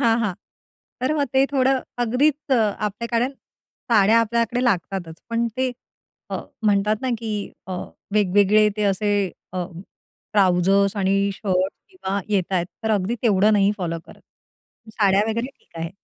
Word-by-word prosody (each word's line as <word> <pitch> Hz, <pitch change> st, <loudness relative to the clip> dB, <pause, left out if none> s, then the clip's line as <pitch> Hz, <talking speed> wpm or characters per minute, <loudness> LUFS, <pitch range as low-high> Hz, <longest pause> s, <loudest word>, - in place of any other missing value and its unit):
हां, 230 Hz, -1 st, +3 dB
हां. 210 Hz, -5 st, -1 dB, 0.7 s
तर 260 Hz, +4 st, +2 dB
मग 285 Hz, -, +2 dB
ते 265 Hz, +1 st, +5 dB
थोडं 265 Hz, -1 st, +2 dB, 0.2 s
अगदीच 280 Hz, +5 st, +1 dB
आपल्याकडे 225 Hz, +2 st, 0 dB, 0.6 s
साड्या 220 Hz, 0 st, +5 dB
आपल्याकडे 235 Hz, +2 st, 0 dB
लागतातच. 185 Hz, -6 st, -1 dB
पण 230 Hz, 0 st, +1 dB
ते 260 Hz, 0 st, +1 dB, 0.9 s
म्हणतात 210 Hz, 0 st, +2 dB
ना, 260 Hz, -, 0 dB
की 215 Hz, -3 st, -4 dB
अ, 185 Hz, -, -5 dB, 0.4 s
वेगवेगळे 205 Hz, +1 st, +4 dB
ते 210 Hz, -, -1 dB
असे 205 Hz, +2 st, 0 dB, 0.4 s
अ, 180 Hz, -1 st, -2 dB, 0.7 s
ट्राउझर्स 195 Hz, +1 st, +3 dB
आणि 195 Hz, 0 st, +2 dB
शर्ट्स 185 Hz, -1 st, -1 dB
किंवा 200 Hz, -, -3 dB
येतायेत, 185 Hz, -3 st, 0 dB, 0.2 s
तर 220 Hz, -, +1 dB
अगदी 205 Hz, +1 st, +1 dB
तेवढं 210 Hz, -1 st, +4 dB
नाही 205 Hz, 0 st, +4 dB
फॉलो 170 Hz, -3 st, -2 dB
करत. -, -, -15 dB, 0.8 s
साड्या 200 Hz, -1 st, +4 dB
वगैरे 230 Hz, +2 st, -1 dB
ठीक -, -, -20 dB
आहे. 165 Hz, 0 st, -3 dB
210 Hz, 135 wpm, -22 LUFS, 195-235 Hz, 0.9 s, ते